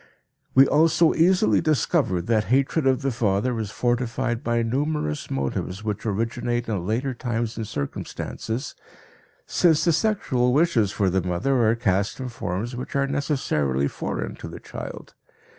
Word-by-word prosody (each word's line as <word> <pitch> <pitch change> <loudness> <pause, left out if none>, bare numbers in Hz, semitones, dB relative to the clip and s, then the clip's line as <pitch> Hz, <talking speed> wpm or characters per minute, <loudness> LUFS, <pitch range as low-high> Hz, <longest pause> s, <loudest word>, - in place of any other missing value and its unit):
We 135 +1 +8
also 165 +3 +4
easily 165 - +3
discover 115 - +1
that 110 +1 +1
hatred 135 - +2
of 130 +1 +2
the 135 - +1
father 115 +1 0
is 110 -3 -3
fortified 120 +1 -1
by 120 0 +1
numerous 130 - -1
motives 70 +9 -3
which 105 +1 -3
originate 115 +3 -1
in 95 -5 -2
later 130 +5 -1
times 120 -2 -3
and 110 -2 -4
circumstances, 110 - -4 0.7
since 165 -4 +3
the 170 - +4
sexual 135 - +1
wishes 135 - +3
for 100 -3 +1
the 95 +1 +1
mother 110 +7 +1
are 115 - +3
cast 100 -3 0
in 130 -1 -4
forms 110 +1 -4
which 125 +3 -6
are 140 0 +2
necessarily 130 - 0
foreign - - -4
to - - -8
the - - -8
child. - - -8
120 Hz, 150 wpm, -24 LUFS, 105-135 Hz, 0.7 s, We